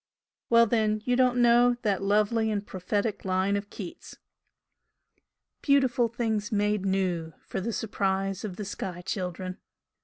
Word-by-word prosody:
Well 235 0 +6
then 215 -1 +1
you 245 - +2
don't 250 -1 +3
know 240 +1 +5
that 205 -4 +1
lovely 215 +3 +2
and 205 -1 -2
prophetic 205 +3 -2
line 190 +1 +1
of 200 0 -4
Keats 185 -5 -9 0.7
" - - -50
'Beautiful 260 -4 +3
things 220 -3 -2
made 210 -1 +1
new 180 -4 -1
For 190 - -4
the 230 - -2
surprise 195 -3 -1
of 200 -4 -5
the 210 - -5
sky 180 -2 -5
children.' 185 -1 -4
205 Hz, 145 wpm, -27 LUFS, 190-230 Hz, 0.7 s, Well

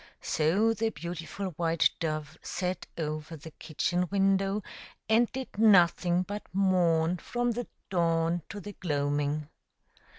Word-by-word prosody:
So 195 +9 +2
the 225 +1 0
beautiful 175 +3 -5
white 165 -1 +4
dove 155 -2 -3
sat 185 -1 -3
over 155 0 -4
the 160 +2 -11
kitchen 175 +4 -1
window, 195 +1 +2 0.4
and 225 +2 +3
did 260 -5 -6
nothing 180 -4 +5
but 205 +2 -5
mourn 180 -3 +2
from 245 +5 -1
the 240 +1 -4 0.2
dawn 165 -1 +1
to 205 - -6
the 205 +1 -8
gloaming. 145 -2 -1
175 Hz, 125 wpm, -29 LUFS, 160-200 Hz, 0.4 s, nothing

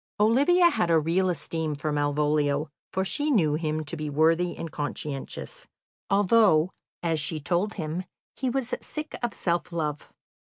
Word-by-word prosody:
Olivia 285 +12 +5
had 175 - 0
a 165 - +5
real 170 +4 +2
esteem 160 -1 -2
for 150 +1 -3
Malvolio, 145 0 +1 0.2
for 190 0 0
she 295 +9 -1
knew 170 - +3
him 155 0 -1
to 150 - -2
be 155 -2 -4
worthy 165 +4 +2
and 165 -2 -5
conscientious, 150 - -5 0.4
although, 195 -4 +4 0.3
as 165 -2 +1
she 155 +2 -1
told 175 +7 -1
him, 165 +1 -3 0.3
he 260 - -1
was 250 -1 -2
"sick 305 0 -5
of 240 -3 -2
self 175 0 -1
love." 150 -3 -3
165 Hz, 155 wpm, -27 LUFS, 150-205 Hz, 0.4 s, Olivia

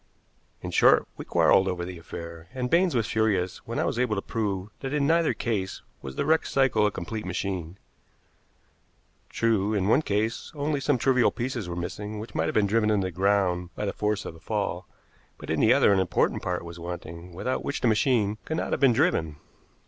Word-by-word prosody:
In - - -4
short, - - +5
we - - -8
quarreled 95 - +4
over 90 -2 -2
the 90 -1 -7
affair, 85 0 -9
and 125 -1 -2
Baines 175 -2 +3
was 115 -3 +2
furious 105 -5 0
when - - -4
I - - +1
was 120 - -1
able 125 -4 +1
to 100 - -2
prove 100 -4 -2
that 135 +1 -4
in 145 -1 +2
neither 165 +2 +3
case 100 -6 -3 0.2
was 65 0 -7
the - - -1
wrecked 160 +2 +2
cycle 125 -6 +3
a - - -1
complete 105 +5 -5
machine. 90 -1 -4 1.5
True, 110 -2 +1
in 95 -2 +1
one 130 - +5
case, 110 -2 -2
only 145 0 -1
some 140 0 +1
trivial 125 0 +3
pieces 120 -6 -4
were 85 - -4
missing 105 +5 -5
which 110 +2 -8
might - - 0
have - - -3
been 105 - +4
driven 110 +1 +2
into 100 -3 +2
the 95 - -3
ground 90 -1 +1
by 105 - -3
the 100 - -2
force 105 0 -1
of - - -6
the 80 - -14
fall; - - -3 0.5
but - - -6
in - - 0
the - - +5
other 100 - +5
an 95 - +3
important 95 - +1
part 90 -1 -3
was 85 0 -9
wanting, 85 0 -7
without 125 +9 -3
which 140 - -3
the - - +2
machine 110 -2 +2
could 160 - -3
not - - -2
have - - 0
been 135 -3 +6
driven. 115 - +1
105 Hz, 210 wpm, -26 LUFS, 90-125 Hz, 1.5 s, been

